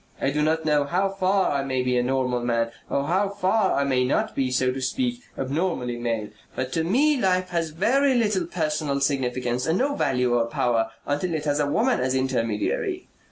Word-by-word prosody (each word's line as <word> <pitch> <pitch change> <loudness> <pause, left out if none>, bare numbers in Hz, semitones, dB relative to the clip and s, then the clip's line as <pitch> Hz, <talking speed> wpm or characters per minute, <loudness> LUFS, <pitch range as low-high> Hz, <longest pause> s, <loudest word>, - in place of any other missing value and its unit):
I 135 - 0
do 150 +2 0
not 160 +1 +1
know 150 -2 +2
how 185 +6 +1
far 195 0 +1
I 140 -1 0
may 130 -2 -1
be 125 0 0
a 125 - +3
normal 125 -1 0
man 115 -1 0 0.2
or 140 - 0
how 190 +7 +1
far 195 +1 +1
I - - +2
may 130 -2 +1
not 125 - 0
be, 135 -2 0
so 125 0 +1
to 135 +1 -5
speak, 245 - -1 0.2
abnormally 135 -3 -1
male, 115 -3 -2 0.3
but 130 0 -3
to 165 - +1
me 265 - +2
life 185 -1 +1
has 170 -2 -1
very 255 - +2
little 210 -7 +1
personal 155 -4 -1
significance 125 -3 -1
and 165 +3 +2
no 280 +5 +1
value 125 - +1
or 115 -1 +2
power 115 -1 0 0.2
until 160 +4 -1
it 155 -1 -3
has 145 0 +1
a 145 - +1
woman 240 - +2
as 130 +1 0
intermediary. 120 -5 -1
145 Hz, 205 wpm, -24 LUFS, 125-185 Hz, 0.3 s, a